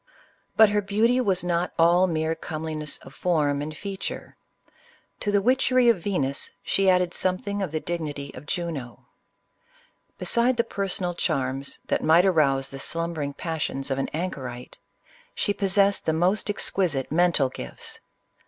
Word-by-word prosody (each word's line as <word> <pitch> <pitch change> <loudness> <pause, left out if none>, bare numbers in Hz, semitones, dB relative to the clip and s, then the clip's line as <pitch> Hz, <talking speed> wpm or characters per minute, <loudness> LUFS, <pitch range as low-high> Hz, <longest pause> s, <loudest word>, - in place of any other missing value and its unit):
But 220 -1 +8
her 205 0 +1
beauty 220 +6 +2
was 190 -6 +1
not 175 0 0
all 175 +3 +5
mere 160 -1 0
comeliness 155 -2 -4
of 135 - -13
form 150 -5 +1
and 155 +1 -5
feature. 195 -1 -6 0.8
To 205 - -1
the 200 -1 +2
witchery 255 0 +4
of 225 -6 +3
Venus 140 -8 -1
she 195 -1 +2
added 180 -1 +3
something 200 +2 -1
of 190 - -2
the 155 - -1
dignity 150 -5 -4
of 135 +3 -11
Juno. 150 -9 -4 1.1
Beside 240 +1 +2
the 235 - +3
personal 195 -5 -2
charms 135 -5 -1
that - - -1
might 165 +4 +5
arouse 140 -7 +3
the 135 - -8
slumbering 160 -2 -2
passions 145 -3 -3
of 135 - 0
an 135 - -1
anchorite, 130 -8 -5 0.6
she 205 - +1
possessed 200 0 +2
the 160 - +3
most 180 +7 +1
exquisite 175 -9 -1
mental 165 -5 +3
gifts. - - -7
170 Hz, 145 wpm, -25 LUFS, 145-195 Hz, 1.1 s, But